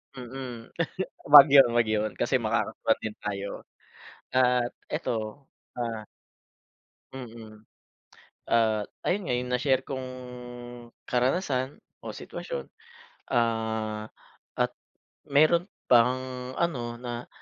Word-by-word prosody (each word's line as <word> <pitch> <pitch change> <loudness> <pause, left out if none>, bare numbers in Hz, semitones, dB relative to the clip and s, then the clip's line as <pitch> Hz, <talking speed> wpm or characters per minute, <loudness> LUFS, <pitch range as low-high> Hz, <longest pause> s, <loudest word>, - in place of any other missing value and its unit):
Mm, 125 -2 -7 0.6
'wag 145 -1 +12
yun 135 -2 +8
'wag 120 -2 +3
yun, 110 0 +1
kasi - - +2
makakasuhan - - 0
din 110 -1 -4
tayo. 100 -1 -3 0.9
At 125 -1 +3 0.2
eto, 110 +4 -3 0.3
ah 115 -3 -3 1.1
Mm. 110 -4 -10 0.9
Ah, 110 -2 +3 0.3
ayun 195 +3 +2
nga 125 - -1
yung 125 0 -3
na-share 130 0 +1
kung 130 -1 -4 1.0
karanasan 130 +1 0 0.2
o - - -5
sitwasyon, - - -6 0.7
ah, 110 -2 0 0.5
at - - +1 0.6
meron 155 +5 +4 0.2
pang 125 +1 +5 0.4
ano 125 -9 -1
na 120 -1 -5
120 Hz, 95 wpm, -27 LUFS, 110-135 Hz, 1.1 s, wag